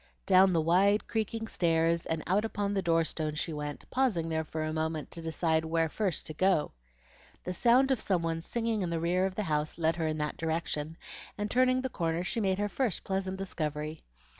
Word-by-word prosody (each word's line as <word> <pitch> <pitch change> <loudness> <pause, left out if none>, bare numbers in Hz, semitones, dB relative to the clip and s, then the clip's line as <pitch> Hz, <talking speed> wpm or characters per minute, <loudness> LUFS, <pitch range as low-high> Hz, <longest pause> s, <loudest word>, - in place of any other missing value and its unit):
Down 190 0 +6
the 170 - +2
wide, 195 +6 +3
creaking 225 0 -2
stairs 165 -3 +1
and 160 -1 -2
out 195 +4 +2
upon 205 -2 -2
the 195 - +1
door 165 -2 +3
stone 155 -1 -2
she 160 +1 -3
went, 150 -1 -5
pausing 220 -11 +1
there 160 0 0
for 155 0 -4
a 155 0 -2
moment 160 -1 -2
to 170 - -5
decide 160 0 +1
where 165 0 +1
first 190 -2 -1
to 155 - -5
go. 185 -1 +2 0.7
The 180 - -3
sound 250 +7 +4
of 260 - +1
some 180 -4 +1
one 165 0 -1
singing 225 +3 -1
in 180 - -1
the 165 -1 -1
rear 180 +3 +2
of 190 - -7
the 210 - -1
house 150 -3 -1
led 165 0 +1
her 160 -2 0
in 155 0 -1
that 150 -1 -2
direction, 160 -1 -2 0.4
and 210 0 -3
turning 255 +1 +3
the 260 - -1
corner 165 -4 -1
she 215 +6 -2
made 190 -3 +1
her 205 +1 0
first 225 -3 -1
pleasant 190 -1 -2
discovery. 155 -4 -3
170 Hz, 215 wpm, -30 LUFS, 160-200 Hz, 0.7 s, Down